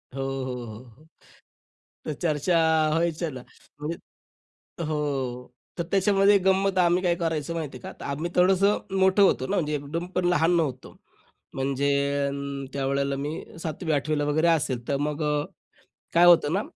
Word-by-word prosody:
हो, 135 - -3 0.2
हो, 130 - -4
हो, 110 +1 -10
हो. 130 +5 -20 1.0
तर 155 - -2
चर्चा 165 +1 +1 0.3
व्हायच्या 165 +1 0
ना. 130 - -8 0.4
म्हणजे 155 +3 -4 0.9
हो, 155 0 -2
हो. 130 -4 -3 0.3
तर - - +1
त्याच्यामध्ये 200 +1 +4
गंमत 190 0 +2
आम्ही 175 0 +3
काय 175 -2 +2
करायचचो 165 -2 -2
माहिती 150 -6 -5
आहे 125 - -18
का, - - -6
तर - - -8
आम्ही 155 +5 -3
थोडंसं 190 +3 +4 0.2
मोठं 190 +2 +4
होतो 195 - +2
ना, 200 - -1
म्हणजे 150 -4 0
एकदम 150 +4 -4
पण 180 - +1
लहान 175 0 +3
नव्हतो. 135 -6 -3 0.6
म्हणजे 135 +1 0 0.4
अ, 140 - -2 0.4
त्यावेळेला 140 0 -1
मी 145 +3 -4 0.2
7वी, 160 +1 -3
8वी 150 +2 0
ला - - 0
वगैरे 155 +3 +2
असेल. 130 -7 0
तर 140 - +1
मग 150 +2 -2 0.9
काय 170 +1 +6
होतं 165 -4 +6
ना, 200 - +1
155 Hz, 160 wpm, -25 LUFS, 140-175 Hz, 1.0 s, काय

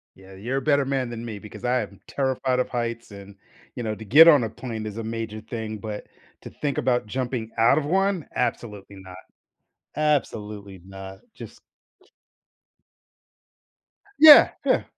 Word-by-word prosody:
Yeah, 95 0 -16
you're 120 +8 -4
a - - -1
better 140 0 +2
man 130 -3 -2
than 120 0 -7
me 110 -3 -7
because 105 0 -12
I 125 +1 +1
am - - -9
terrified 130 -2 -1
of - - -1
heights 115 -2 -4
and, 100 0 -12 0.4
you - - -5
know, 110 -2 -3
to 110 - -11
get 155 +10 +8
on 145 -7 +6
a 110 - -3
plane 115 -3 -7
is 105 0 -7
a 115 - -4
major 110 -1 -5
thing, 110 -1 -6
but, 105 0 -7 0.4
to - - -10
think 145 -2 -4
about 125 -3 0
jumping 120 -2 -4
out 120 +6 +4
of 150 - -1
one? 190 -1 0
Absolutely 105 -5 -4
not. 95 -1 -12 0.8
Absolutely 105 - -2
not, 95 0 -11 0.2
just - - -12 2.6
Yeah, 305 -1 +9
yeah. - - +2
115 Hz, 160 wpm, -24 LUFS, 105-130 Hz, 2.6 s, Yeah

